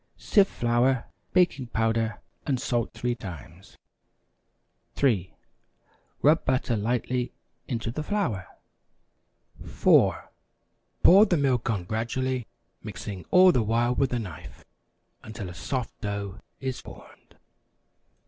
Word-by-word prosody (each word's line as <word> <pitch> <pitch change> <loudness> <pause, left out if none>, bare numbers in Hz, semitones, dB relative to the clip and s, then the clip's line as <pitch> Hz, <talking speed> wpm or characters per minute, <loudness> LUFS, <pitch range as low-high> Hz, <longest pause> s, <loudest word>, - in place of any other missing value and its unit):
Sift 200 -2 +3
flour, 120 +2 +1 0.3
baking 175 -8 +2
powder 115 -1 0 0.3
and 135 -4 +1
salt 120 -2 -1
three 120 +2 -2
times. 90 - -10 1.2
3. 105 -10 +1 0.9
Rub 155 +3 +5
butter 130 -2 0
lightly 120 +3 -1 0.3
into 115 -3 -3
the 155 - -4
flour. 150 - -2 1.2
4. - - +3 0.7
Pour 200 +5 +8
the 175 - +2
milk 130 -5 +1
on 100 -5 -1
gradually, 120 +4 -2 0.3
mixing 100 -2 -7
all 185 0 +7
the 125 - +2
while 115 +3 +1
with 135 0 +1
a 125 - 0
knife, 85 -8 -8 0.6
until 110 -3 -7
a - - -10
soft 125 +7 -4
dough 100 -1 -4 0.2
is 130 -2 -3
formed. - - -15
120 Hz, 110 wpm, -26 LUFS, 105-130 Hz, 1.2 s, Pour